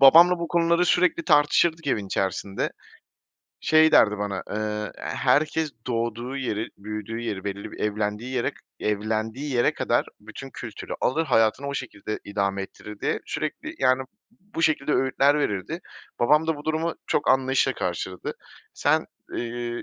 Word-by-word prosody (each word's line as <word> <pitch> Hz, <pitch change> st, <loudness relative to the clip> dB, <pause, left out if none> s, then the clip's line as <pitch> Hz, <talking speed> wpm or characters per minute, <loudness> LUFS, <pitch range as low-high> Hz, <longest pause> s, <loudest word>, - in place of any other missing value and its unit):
babamla 170 Hz, +6 st, +8 dB
bu 170 Hz, -1 st, -3 dB
konuları 170 Hz, +1 st, +3 dB
sürekli 175 Hz, -1 st, +3 dB
tartışırdık 160 Hz, +2 st, +3 dB
evin 105 Hz, -7 st, 0 dB
içerisinde. 95 Hz, +1 st, -1 dB, 0.9 s
Şey 155 Hz, 0 st, +5 dB
derdi 105 Hz, -1 st, +6 dB
bana, 100 Hz, -2 st, -2 dB
eee, 105 Hz, 0 st, -2 dB
"Herkes 155 Hz, +1 st, +1 dB, 0.2 s
doğduğu 120 Hz, +2 st, -2 dB
yeri, 115 Hz, -5 st, -2 dB
büyüdüğü 105 Hz, +2 st, -5 dB
yeri, 105 Hz, -5 st, -4 dB
belirli 100 Hz, 0 st, -5 dB
bir -, -, -10 dB
evlendiği 105 Hz, +3 st, -1 dB
yere 120 Hz, -, 0 dB, 0.3 s
evlendiği 110 Hz, +6 st, -1 dB
yere 120 Hz, -, +3 dB
kadar -, -, +1 dB
bütün -, -, -9 dB
kültürü -, -, -7 dB
alır, 160 Hz, +6 st, +1 dB
hayatını 125 Hz, 0 st, +2 dB
o 140 Hz, -, -3 dB
şekilde 110 Hz, -5 st, -4 dB
idame 100 Hz, -1 st, -1 dB
ettirir." 105 Hz, +1 st, -10 dB
diye -, -, 0 dB
sürekli, 305 Hz, -, -4 dB
yani, 130 Hz, +1 st, +3 dB, 0.4 s
bu 195 Hz, -4 st, -5 dB
şekilde 150 Hz, -2 st, +2 dB
öğütler 135 Hz, +2 st, +3 dB
verirdi. 100 Hz, -10 st, -2 dB, 0.4 s
Babam 150 Hz, +6 st, +4 dB
da 160 Hz, -2 st, +1 dB
bu 145 Hz, -, -10 dB
durumu 160 Hz, +1 st, 0 dB
çok -, -, 0 dB
anlayışla 130 Hz, 0 st, +3 dB
karşıladı. 90 Hz, +1 st, -3 dB, 0.4 s
Sen, -, -, +2 dB, 0.3 s
ııı 120 Hz, 0 st, -4 dB
120 Hz, 140 wpm, -25 LUFS, 105-155 Hz, 0.9 s, babamla